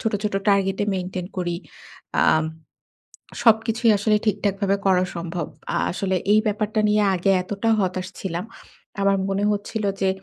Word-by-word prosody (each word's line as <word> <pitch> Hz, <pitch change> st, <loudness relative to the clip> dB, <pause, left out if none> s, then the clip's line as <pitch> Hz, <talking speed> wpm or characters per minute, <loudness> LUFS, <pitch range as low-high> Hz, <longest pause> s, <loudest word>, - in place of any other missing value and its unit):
ছোট, 225 Hz, -, -1 dB
ছোট 210 Hz, -2 st, -2 dB
টার্গেটে 195 Hz, 0 st, +2 dB
মেইনটেইন 185 Hz, -1 st, -4 dB
করি। 175 Hz, -1 st, -1 dB, 0.7 s
আম 155 Hz, 0 st, +4 dB, 1.0 s
সবকিছুই 225 Hz, +1 st, +3 dB
আসলে 210 Hz, +1 st, +2 dB
ঠিকঠাকভাবে 200 Hz, -1 st, +1 dB
করা 185 Hz, -1 st, +4 dB
সম্ভব। 170 Hz, -1 st, -3 dB, 0.3 s
আ -, -, 0 dB, 0.2 s
আসলে 190 Hz, +1 st, -1 dB, 0.2 s
এই 215 Hz, -, +6 dB
ব্যাপারটা 215 Hz, +1 st, -1 dB
নিয়ে 210 Hz, 0 st, +3 dB
আগে 185 Hz, +2 st, +2 dB
এতটা 205 Hz, +4 st, -2 dB
হতাশ 185 Hz, -1 st, -1 dB
ছিলাম। 180 Hz, 0 st, -3 dB, 0.6 s
আমার 195 Hz, 0 st, +3 dB
মনে 195 Hz, +1 st, 0 dB
হচ্ছিল 210 Hz, +1 st, -3 dB, 0.2 s
যে, 190 Hz, -, +3 dB
195 Hz, 140 wpm, -23 LUFS, 185-210 Hz, 1.0 s, এই